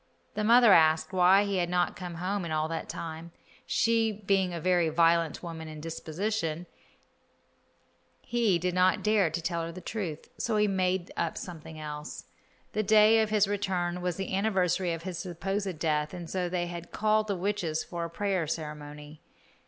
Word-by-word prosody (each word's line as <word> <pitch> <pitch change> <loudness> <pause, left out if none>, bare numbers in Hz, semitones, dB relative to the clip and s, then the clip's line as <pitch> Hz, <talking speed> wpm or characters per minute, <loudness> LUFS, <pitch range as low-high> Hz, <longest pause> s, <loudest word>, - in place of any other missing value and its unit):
The 215 - -2
mother 235 -1 +7
asked 160 +1 +4
why 185 +2 +5
he 200 -1 -1
had 175 -1 0
not 180 0 +1
come 175 -2 -7
home 185 +3 -2
in 170 - -5
all 155 0 0
that 165 0 -4
time. 165 +1 -6 0.4
She 225 -1 +2
being 195 -3 0
a 170 - -4
very 175 -1 +2
violent 165 0 +2
woman 165 -2 -6
in 155 -1 -8
disposition, 165 +2 -3 1.6
he 235 -7 +2
did 180 +1 -1
not 185 +1 +3
dare 210 -5 +3
to 170 +2 -3
tell 170 0 -1
her 165 0 -4
the 175 - -9
truth, 175 -5 -5
so 220 -2 0
he 210 0 +3
made 185 -2 0
up 170 -1 -2
something 160 -3 -8
else. 150 -1 -7 0.5
The 215 - +1
day 215 +1 +6
of 220 - 0
his 210 -2 +3
return 185 -3 -1
was 180 -1 -1
the 195 +1 -3
anniversary 190 -3 +1
of 165 0 -4
his 185 -2 -5
supposed 190 +1 -3
death, 150 0 -1
and 175 -2 -7
so 180 0 -2
they 175 -1 -1
had 175 -1 -7
called 215 0 +1
the 200 - -1
witches 180 -4 -1
for 170 -1 -5
a 170 - -4
prayer 190 -2 -1
ceremony. 150 -1 -6
180 Hz, 180 wpm, -29 LUFS, 165-200 Hz, 1.6 s, mother